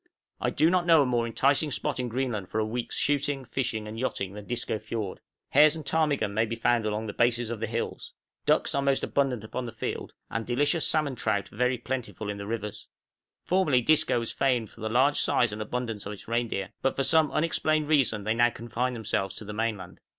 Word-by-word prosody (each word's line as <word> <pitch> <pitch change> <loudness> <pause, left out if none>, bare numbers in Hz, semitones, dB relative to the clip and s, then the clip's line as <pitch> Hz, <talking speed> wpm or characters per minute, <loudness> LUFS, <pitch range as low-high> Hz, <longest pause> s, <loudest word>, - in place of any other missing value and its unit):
I - - 0
do 160 +2 +3
not 180 -1 +2
know 165 -3 +7
a - - 0
more 120 -2 +1
enticing 140 +6 +2
spot 145 -1 -2
in 125 -1 -1
Greenland 115 -6 -2
for 105 - -3
a 110 - +2
week's 115 +2 -3
shooting, 145 -1 0
fishing, 115 -5 -2
and 110 +1 -6
yachting 100 -6 -2
than 105 0 -8
Disco 120 -2 -2
Fiord; 110 -3 -4 0.3
hares 155 +1 +6
and 155 -3 -7
ptarmigan 150 -9 +1
may 110 +2 +2
be 115 - -3
found 115 -1 +2
along 105 +1 -2
the 105 - -5
bases 120 -1 +1
of 115 - -4
the 115 - -2
hills; 115 +2 -4 0.4
ducks - - +3
are 140 - +1
most 140 -1 +1
abundant 135 -6 0
upon 125 +3 -4
the - - -5
fiord, - - -4 0.2
and 115 - -2
delicious 145 +7 +2
salmon 150 -3 +1
trout 110 -3 -1
very 125 +3 0
plentiful 115 -5 -4
in 100 - -6
the 100 - -6
rivers. 105 -2 -5 0.6
Formerly 155 -9 +2
Disco 155 -4 +3
was 115 - -3
famed 125 -5 +1
for 115 - -15
the 110 - -2
large 130 +5 +3
size 115 -4 +2
and 105 - -5
abundance 115 -2 -4
of 105 - -4
its 100 - -12
reindeer; 115 -4 -1
but 135 - +1
for 135 - 0
some 155 +3 +4
unexplained 155 -1 +1
reason 130 -9 +2
they 110 +2 +1
now 120 +1 +4
confine 120 +2 -3
themselves 95 -4 -2
to 110 - -8
the 105 - -6
mainland. 105 -4 -3
120 Hz, 215 wpm, -28 LUFS, 110-135 Hz, 0.6 s, know